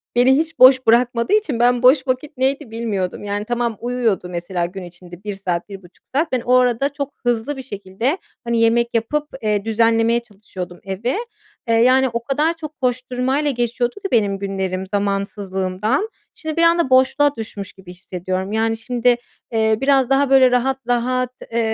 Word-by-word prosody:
beni 260 +3 +5
hiç 325 0 -2
boş 260 0 +7
bırakmadığı 235 - +3
için 315 - +1
ben 245 +1 +3
boş 265 +1 +5
vakit 260 +3 -2
neydi, 265 -1 -1
bilmiyordum. 205 -5 -3
Yani, 205 +1 -3
tamam 235 -2 -2
uyuyordu 235 -7 -1
mesela 175 0 -3
gün 185 +1 -7
içerisinde 175 +1 -12
1 205 -1 -4
saat, 185 -1 -3
1,5 190 -3 -13
saat. 310 +1 +1
Ben 250 -2 0
o 250 - 0
arada 250 +2 +2
çok 285 -1 -4
hızlı 245 +4 0
bir - - -5
şekilde 210 - -3 0.3
hani, 235 -1 0
yemek 235 +1 +3
yapıp, 295 +7 -1
eee, 210 -1 0
düzenlemeye 225 +1 +2
çalışıyordum 190 -5 -9
evi. 200 - -2 0.5
Eee, 230 - +2
yani, 255 +3 +4
o 235 0 -4
kadar 300 +5 +1
çok 310 -2 -9
koşturmayla 255 +3 0
geçiyordu 240 0 -1
ki 390 -1 -6
benim 200 -4 +2
günlerim 190 -1 -3
zamansızlığımdan. 200 - -1 0.2
Şimdi 315 0 -6
bir - - +3
anda 335 -4 +3
boşluğa 270 +3 +3
düşmüş 205 -3 -7
gibi 180 -2 -13
hissediyorum. 185 +2 -4
Yani, 225 +1 0
şimdi, 245 +1 +1 0.4
eee, 220 -1 +2
biraz 270 -2 +3
daha 270 0 +3
böyle 260 -2 +6
rahat 260 +2 +1
rahat, 250 +1 0 0.2
eee, 235 - 0
235 Hz, 170 wpm, -20 LUFS, 200-260 Hz, 0.5 s, boş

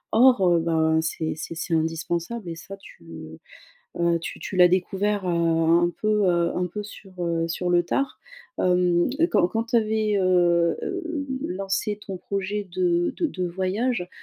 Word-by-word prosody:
Or, 240 -6 +5
heu, 170 -1 +4
ben 160 -1 +2
c'est 160 0 -2
c'est 165 +1 -7
c'est 165 +1 -4
indispensable 165 +6 -2
et 165 - -4
ça 195 +4 -10
tu, 195 - -16
heu 80 -1 -10 0.6
heu, 170 -1 +2
tu - - -6
tu - - -7
l'as 180 -1 +7
découvert, 195 +2 0
heu, - - -1
un 170 0 +2
peu, 215 -1 +2
heu, 170 -1 +1
un 180 0 0
peu 210 +4 -6
sur, 200 -1 -12
heu, 165 0 -1
sur 180 +2 -2
le 175 0 +4
tard. 275 +9 -2 0.4
Hem, 180 0 +2 0.2
quand 175 - +4
quand 225 +3 -1
tu 235 +1 0
avais, 215 -1 +1
heu, 175 -2 +3
hem, 330 -6 -3 0.2
lancé 195 +3 -2
ton 195 -2 -6
projet 200 +1 -4
de 175 -1 +1
de 335 - +1
de 185 -10 -4
voyage, 190 +2 -1
180 Hz, 175 wpm, -24 LUFS, 170-205 Hz, 0.6 s, l'as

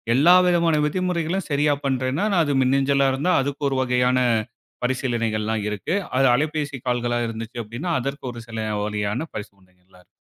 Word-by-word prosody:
எல்லா 170 +7 +6
விதமான 170 -2 +3
விதிமுறைகளையும் 180 +1 -2
சரியா 145 +1 +2
பண்றேன்னா, 130 +6 0 0.2
அது 145 -2 0
மின்னஞ்சலா 135 +1 +2
இருந்தா 160 +8 +1
அதுக்கு 140 +2 -4
ஒரு 135 - -1
வகையான 125 0 +2 0.7
பரிசீலனைகளெல்லாம் 115 -4 -1
இருக்கு. 105 - -3 0.2
அது 135 - +4
அலைபேசி 150 -1 -2
கால்களா 120 -1 0
இருந்துச்சு 115 +1 -6
அப்டின்னா, 120 +11 -5
அதற்கு 140 +3 -5
ஒரு 120 - -9
சில 115 -1 -8 0.3
வழியான 105 +1 -2
பரிசீலனைகளெல்லாம் 95 -3 -12
இருக்கு. - - -43
130 Hz, 140 wpm, -23 LUFS, 115-150 Hz, 0.7 s, எல்லா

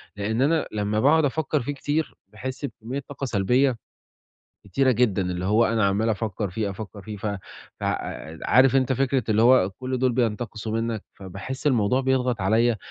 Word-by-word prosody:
لأن 110 +4 -1
أنا 155 +3 +2
لما 105 0 -1
باقعد 155 +5 +4
أفكَّر 150 +1 0
فيه 145 +4 -3
كتير 145 +3 -2 0.2
باحس 130 +6 -5
بكمية 125 +1 -6
طاقة 140 -1 -5
سلبية 125 +3 +2 0.9
كتيرة 130 +7 +2
جدًا، 115 -6 +2
اللي 90 0 -3
هو 110 +4 +4
أنا 110 -1 +1
عَمّال 100 +3 +1
أفكَّر 105 -2 -2
فيه، 100 +2 -2
أفكر 100 0 -8
فيه، 105 +1 -7
ف 100 - -5 0.5
ف - - -4 0.6
عارف 130 +2 +5
أنت 130 -1 +2
فكرة 135 0 +1
اللي 110 +1 +3
هو 120 -6 +5
كل 130 +6 -4
دول 130 0 +2
بينتقصوا 115 -2 -2
منَّك، 115 -2 -3
فباحس 100 +9 -7
الموضوع 125 -2 +3
بيضغط 130 -3 0
عليّا، 110 +4 +3
115 Hz, 165 wpm, -24 LUFS, 105-130 Hz, 0.9 s, عارف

